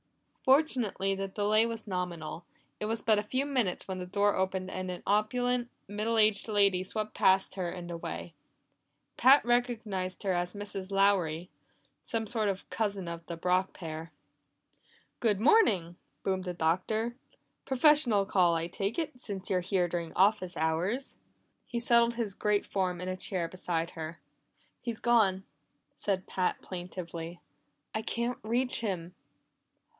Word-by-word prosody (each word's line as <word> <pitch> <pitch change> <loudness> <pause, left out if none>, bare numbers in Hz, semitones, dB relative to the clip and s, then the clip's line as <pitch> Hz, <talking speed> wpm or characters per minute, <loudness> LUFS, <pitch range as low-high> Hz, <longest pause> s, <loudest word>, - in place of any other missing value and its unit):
Fortunately, 255 -9 +2
the 195 0 -2
delay 210 +3 +2
was 230 -1 -5
nominal; 175 -3 -4 0.4
it - - -2
was 225 +1 -2
but 215 -2 +4
a - - -2
few 260 +6 -1
minutes 250 -10 -1
when 190 -1 -4
the 180 - -5
door 205 +2 +2
opened 190 0 -1
and 185 0 -4
an 180 -1 -6
opulent, 245 +4 +1 0.2
middle 215 +3 -1
aged 215 -1 +3
lady 200 -3 +3
swept 215 +3 -3
past 190 0 +3
her 185 -2 -2
and 175 0 -6
away. 170 -1 -5 0.8
Pat 270 +1 +6
recognized 225 -7 0
her 195 - +1
as 175 +2 -2
Mrs. 200 -2 -6
Lowry, 185 -4 +2 0.5
some 225 -1 -2
sort 220 -1 0
of 195 -1 -4
cousin 200 -4 -1
of 170 0 -5
the 170 - -5
Brock 180 +2 +1
pair. 160 -1 -7 1.1
"Good 215 -5 +2
morning!" 210 - +4 0.3
boomed 190 -1 -1
the 180 -1 -3
Doctor. 200 +8 0 0.5
"Professional 265 -6 +4
call, 180 -4 +3
I 165 0 0
take 195 +4 -3
it, 290 -7 -3
since 195 -4 -4
you're 185 -1 +2
here 180 0 +1
during 170 -1 -3
office 185 -2 +2
hours." 175 - -1 0.5
He 235 - -2
settled 235 0 +4
his 225 -4 -2
great 210 +1 +1
form 185 -3 -1
in 180 - -5
a 185 - -1
chair 185 -2 -1
beside 170 -2 -2
her. 160 0 -6 0.6
"He's 235 -2 -4
gone!" 210 -5 +3 0.5
said 190 -2 -1
Pat 185 -1 0
plaintively. 175 -2 -6 0.5
"I 220 - -1
can't 235 +2 -2
reach 245 +4 +1
him." 180 -5 -3
195 Hz, 150 wpm, -30 LUFS, 180-225 Hz, 1.1 s, Pat